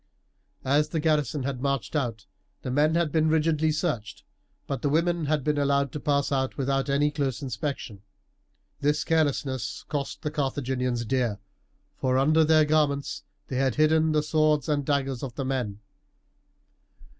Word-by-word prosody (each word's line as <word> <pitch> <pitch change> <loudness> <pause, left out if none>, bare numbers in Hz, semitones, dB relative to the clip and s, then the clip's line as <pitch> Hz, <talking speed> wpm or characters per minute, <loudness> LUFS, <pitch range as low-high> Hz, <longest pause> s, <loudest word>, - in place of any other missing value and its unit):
As 145 +3 +2
the 160 - -1
garrison 150 -3 +1
had 130 -2 -3
marched 140 0 -2
out 120 -7 -2 0.4
the 130 - -3
men 150 +4 +3
had 170 -3 +1
been 155 0 +2
rigidly 155 0 +2
searched; 150 - -3 0.4
but 135 - -4
the 145 - +1
women 170 +2 +1
had 150 -1 0
been 150 0 +1
allowed 140 -1 +1
to 150 - -5
pass 140 -1 0
out 130 -1 -1
without 135 0 0
any 145 +2 +2
close 140 -2 -2
inspection. 130 -5 -4 0.8
This 150 +2 +1
carelessness 135 -8 -1
cost 145 +2 -4
the 150 - -2
Carthaginians 130 -4 -1
dear, 120 -4 0 0.6
for 130 -1 +1
under 155 +4 +4
their 155 0 +5
garments 150 -2 0 0.3
they 130 - -3
had 130 -2 +1
hidden 155 +1 +3
the 150 -1 +2
swords 155 -1 +2
and 145 -2 +1
daggers 135 -3 -1
of 130 -3 -6
the 135 - -3
men. 120 -6 -3
145 Hz, 155 wpm, -26 LUFS, 130-155 Hz, 0.8 s, their